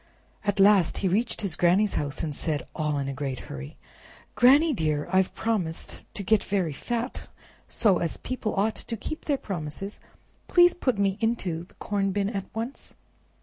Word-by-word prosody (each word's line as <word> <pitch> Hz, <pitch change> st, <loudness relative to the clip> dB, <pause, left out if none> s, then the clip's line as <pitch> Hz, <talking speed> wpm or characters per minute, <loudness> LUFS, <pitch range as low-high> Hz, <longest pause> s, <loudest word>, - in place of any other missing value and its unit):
At 205 Hz, -1 st, 0 dB
last 195 Hz, -4 st, +5 dB
he -, -, +4 dB
reached 220 Hz, +6 st, 0 dB
his 195 Hz, -6 st, -1 dB
Granny's 185 Hz, +5 st, +3 dB
house, 145 Hz, -1 st, -2 dB
and 150 Hz, -3 st, -3 dB
said, 150 Hz, -1 st, -2 dB
all 150 Hz, -2 st, 0 dB
in 140 Hz, -1 st, -2 dB
a 135 Hz, -, -3 dB
great 135 Hz, -1 st, -4 dB
hurry, 70 Hz, 0 st, -8 dB, 0.6 s
"Granny, 290 Hz, +6 st, +6 dB
dear, 155 Hz, -, 0 dB
I've 190 Hz, 0 st, +2 dB
promised 190 Hz, -8 st, -2 dB
to 200 Hz, -, -4 dB
get 215 Hz, +2 st, +3 dB
very 185 Hz, -6 st, -1 dB
fat; 235 Hz, -, -4 dB, 0.4 s
so, 205 Hz, -6 st, +3 dB
as 170 Hz, -, -2 dB
people 255 Hz, -4 st, -3 dB
ought 210 Hz, +3 st, +2 dB
to 230 Hz, -, 0 dB
keep 310 Hz, +8 st, -6 dB
their 285 Hz, -2 st, +1 dB
promises, 190 Hz, -, -5 dB, 0.5 s
please 350 Hz, 0 st, +6 dB
put 255 Hz, -, 0 dB
me 200 Hz, 0 st, +1 dB
into 190 Hz, -8 st, -1 dB
the -, -, -25 dB
corn 200 Hz, -1 st, -1 dB
bin 200 Hz, +1 st, 0 dB
at 195 Hz, -3 st, -3 dB
once." 230 Hz, +5 st, -5 dB
195 Hz, 175 wpm, -26 LUFS, 160-225 Hz, 0.6 s, Granny